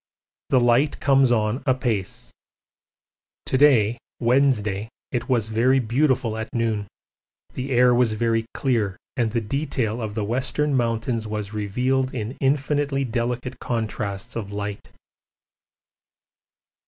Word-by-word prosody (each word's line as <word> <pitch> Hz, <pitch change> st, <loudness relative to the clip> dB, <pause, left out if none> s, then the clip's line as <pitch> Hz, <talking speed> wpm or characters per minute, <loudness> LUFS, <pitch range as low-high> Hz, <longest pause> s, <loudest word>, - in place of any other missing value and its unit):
The 130 Hz, -, +4 dB
light 120 Hz, +4 st, +3 dB
comes 135 Hz, -2 st, +4 dB
on 110 Hz, +2 st, +1 dB
apace. 120 Hz, -7 st, -1 dB, 1.1 s
To -, -, -1 dB
day 120 Hz, -5 st, +4 dB, 0.2 s
(Wednesday) 115 Hz, -5 st, +2 dB, 0.2 s
it 120 Hz, 0 st, -3 dB
was 115 Hz, -4 st, +1 dB
very 120 Hz, +4 st, +3 dB
beautiful 125 Hz, -1 st, +1 dB
at 110 Hz, 0 st, -4 dB
noon: 110 Hz, -3 st, 0 dB, 0.7 s
the 130 Hz, +2 st, -4 dB
air 125 Hz, -1 st, +5 dB
was 120 Hz, -2 st, +3 dB
very 115 Hz, +1 st, +1 dB
clear 110 Hz, -8 st, 0 dB, 0.2 s
and 120 Hz, -3 st, +1 dB
the 115 Hz, +1 st, 0 dB
detail 120 Hz, -1 st, -2 dB
of 105 Hz, -2 st, -4 dB
the 110 Hz, -, -1 dB
Western 130 Hz, +6 st, 0 dB
Mountains 115 Hz, -2 st, -1 dB
was 105 Hz, -1 st, -4 dB
revealed 130 Hz, +6 st, 0 dB
in 115 Hz, +2 st, -4 dB
infinitely 140 Hz, 0 st, +1 dB
delicate 125 Hz, +1 st, -3 dB
contrasts 110 Hz, -4 st, -3 dB
of 105 Hz, -3 st, -4 dB
light. 100 Hz, 0 st, -5 dB
120 Hz, 120 wpm, -23 LUFS, 110-130 Hz, 1.1 s, air